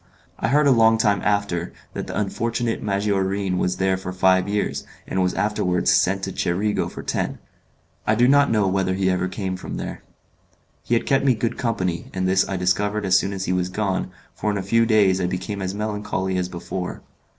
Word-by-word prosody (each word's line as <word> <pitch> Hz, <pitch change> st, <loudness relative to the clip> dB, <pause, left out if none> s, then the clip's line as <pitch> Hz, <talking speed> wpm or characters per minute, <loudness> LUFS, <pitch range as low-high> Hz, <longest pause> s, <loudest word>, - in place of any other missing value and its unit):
I -, -, 0 dB
heard, 145 Hz, +5 st, +3 dB
a 140 Hz, -, +5 dB
long 115 Hz, -2 st, +5 dB
time 105 Hz, -2 st, +2 dB
after, 100 Hz, -4 st, 0 dB, 0.2 s
that -, -, -5 dB
the -, -, -3 dB
unfortunate 115 Hz, +3 st, -1 dB
Maggiorin 100 Hz, -2 st, 0 dB
was 90 Hz, -, 0 dB
there 95 Hz, 0 st, +1 dB
for 95 Hz, 0 st, -6 dB
five 95 Hz, +1 st, +3 dB
years, 105 Hz, 0 st, -1 dB, 0.2 s
and 95 Hz, -, -1 dB
was 90 Hz, 0 st, 0 dB
afterwards 95 Hz, -4 st, +1 dB
sent 95 Hz, +1 st, +2 dB
to 95 Hz, -, -2 dB
Cerigo 100 Hz, +4 st, 0 dB
for -, -, -8 dB
ten. -, -, -2 dB, 0.7 s
I 105 Hz, -, +4 dB
do 120 Hz, +2 st, +4 dB
not 140 Hz, +1 st, +5 dB
know 105 Hz, -3 st, +2 dB
whether 95 Hz, -1 st, 0 dB
he 95 Hz, 0 st, +1 dB
ever 90 Hz, 0 st, 0 dB
came 95 Hz, -1 st, -3 dB
from 95 Hz, -, -6 dB
there. -, -, -6 dB, 0.8 s
He 120 Hz, -, 0 dB
had 115 Hz, -, 0 dB
kept 135 Hz, -, +2 dB
me 130 Hz, -3 st, +4 dB
good 115 Hz, +1 st, -1 dB
company, 95 Hz, -8 st, -2 dB
and 95 Hz, 0 st, 0 dB
this 95 Hz, 0 st, +2 dB
I 95 Hz, -, -1 dB
discovered 100 Hz, +3 st, 0 dB
as 95 Hz, -1 st, +3 dB
soon 100 Hz, -, +2 dB
as 95 Hz, -1 st, -3 dB
he 90 Hz, -, 0 dB
was 90 Hz, 0 st, 0 dB
gone, 95 Hz, -1 st, -1 dB, 0.2 s
for 105 Hz, -, -2 dB
in 100 Hz, -, 0 dB
a 95 Hz, -, -3 dB
few 115 Hz, +4 st, +3 dB
days 100 Hz, -4 st, +4 dB
I 90 Hz, -, +1 dB
became 95 Hz, +3 st, -4 dB
as 95 Hz, +1 st, -3 dB
melancholy 105 Hz, -3 st, -2 dB
as 90 Hz, 0 st, -2 dB
before. 90 Hz, +1 st, -5 dB
95 Hz, 205 wpm, -23 LUFS, 95-105 Hz, 0.8 s, a